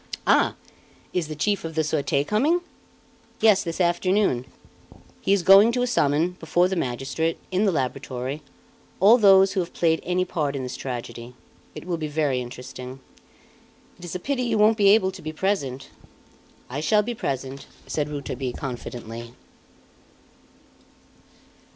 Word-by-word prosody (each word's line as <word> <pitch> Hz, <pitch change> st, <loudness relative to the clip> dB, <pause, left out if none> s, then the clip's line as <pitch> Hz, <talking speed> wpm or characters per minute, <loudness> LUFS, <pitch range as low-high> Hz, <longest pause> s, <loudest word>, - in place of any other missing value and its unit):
"Ah! -, -, +3 dB, 0.6 s
Is 175 Hz, -4 st, -1 dB
the 155 Hz, -, -6 dB
Chief 200 Hz, +7 st, 0 dB
of 165 Hz, -1 st, -6 dB
the 160 Hz, -, +2 dB
Surete 145 Hz, -2 st, 0 dB
coming?" 290 Hz, -, +2 dB, 0.8 s
"Yes, 215 Hz, -3 st, +4 dB
this 165 Hz, 0 st, -5 dB
afternoon. 175 Hz, -, +1 dB, 0.7 s
He -, -, 0 dB
is 200 Hz, -3 st, +3 dB
going 195 Hz, +5 st, +7 dB
to 250 Hz, 0 st, +1 dB
summon, 160 Hz, -, +1 dB
before 175 Hz, +2 st, +2 dB
the 190 Hz, -, -2 dB
magistrate, 135 Hz, +3 st, -2 dB
in 190 Hz, +3 st, +2 dB
the 200 Hz, -, +3 dB
laboratory, 130 Hz, -1 st, -3 dB, 0.6 s
all 215 Hz, +6 st, +7 dB
those 195 Hz, -2 st, +6 dB
who 195 Hz, -, 0 dB
have 175 Hz, -1 st, -4 dB
played 160 Hz, -2 st, +2 dB
any 180 Hz, +1 st, 0 dB
part 150 Hz, -5 st, -2 dB
in 135 Hz, -, -3 dB
this 125 Hz, 0 st, -5 dB
tragedy. 120 Hz, -1 st, -6 dB, 0.4 s
It -, -, -8 dB
will 175 Hz, -2 st, -2 dB
be 155 Hz, -1 st, -3 dB
very 145 Hz, -4 st, 0 dB
interesting. 125 Hz, +1 st, -8 dB, 1.0 s
It -, -, -14 dB
is 175 Hz, -, -6 dB
a -, -, -2 dB
pity 265 Hz, +6 st, -2 dB
you 235 Hz, -3 st, 0 dB
won't 215 Hz, +1 st, +5 dB
be 205 Hz, -2 st, +4 dB
able 200 Hz, -2 st, +4 dB
to 190 Hz, -1 st, -11 dB
be 155 Hz, -, -5 dB
present." 155 Hz, -7 st, -2 dB, 0.8 s
"I 135 Hz, +3 st, -5 dB
shall 210 Hz, +8 st, +3 dB
be 240 Hz, +3 st, -3 dB
present," 135 Hz, -, -4 dB, 0.2 s
said 150 Hz, -1 st, -2 dB
Rouletabille 140 Hz, -3 st, -4 dB
confidently. 120 Hz, -3 st, -7 dB
160 Hz, 150 wpm, -24 LUFS, 135-195 Hz, 1.0 s, going